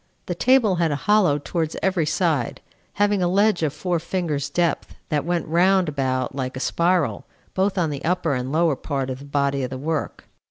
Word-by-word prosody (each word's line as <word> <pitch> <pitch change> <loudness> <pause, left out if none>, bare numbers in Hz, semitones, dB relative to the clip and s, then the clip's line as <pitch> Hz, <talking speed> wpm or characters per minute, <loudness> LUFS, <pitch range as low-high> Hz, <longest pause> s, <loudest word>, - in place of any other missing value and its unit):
The - - -2
table 245 -8 +3
had 165 -1 +2
a 145 - 0
hollow 205 -8 +4
towards 160 +2 -3
every 185 -5 +1
side, 155 -8 0 0.3
having 205 -1 +1
a 175 - +2
ledge 200 +1 +2
of 155 -3 +1
four 175 +2 -2
fingers' 160 -5 -2
depth, 170 0 -1
that 150 -2 0
went 175 -1 -1
round 185 +3 +3
about 130 -3 -1
like 130 -1 -4
a - - -4
spiral, 170 +3 0 0.3
both 190 +1 0
on 165 -4 +1
the 140 - -5
upper 175 -3 0
and 130 0 -3
lower 160 -1 +2
part 135 -2 -3
of 130 - -6
the 140 - -11
body 140 -1 0
of 130 - -2
the 130 - -5
work. 155 +3 -3
160 Hz, 200 wpm, -23 LUFS, 140-180 Hz, 0.3 s, hollow